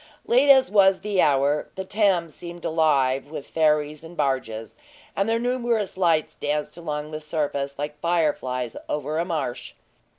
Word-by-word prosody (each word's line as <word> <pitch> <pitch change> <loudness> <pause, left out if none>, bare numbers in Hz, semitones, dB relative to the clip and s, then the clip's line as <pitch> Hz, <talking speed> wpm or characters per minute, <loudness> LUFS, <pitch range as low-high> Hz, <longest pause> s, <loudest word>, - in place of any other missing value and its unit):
Late 255 +4 +4
as 265 -1 +6
was 195 -2 +5
the 205 -3 +1
hour, 145 +1 +2
the 190 - -4
Thames 185 -5 +1
seemed 175 -1 -9
alive 140 -4 +2
with 150 -2 -7
ferries 150 -1 +1
and 165 +1 -12
barges, 115 -5 -2 0.4
and 195 +3 0
their 225 - +2
numerous 240 -4 -1
lights 170 -4 +1
danced 150 +1 -3
along 150 -3 -5
the 155 0 -5
surface 140 -3 -2
like 150 +1 -5
fire 170 -2 +2
flies 125 -2 -4
over 150 +2 -2
a 170 - 0
marsh. 150 -8 -4
155 Hz, 160 wpm, -24 LUFS, 145-185 Hz, 0.4 s, as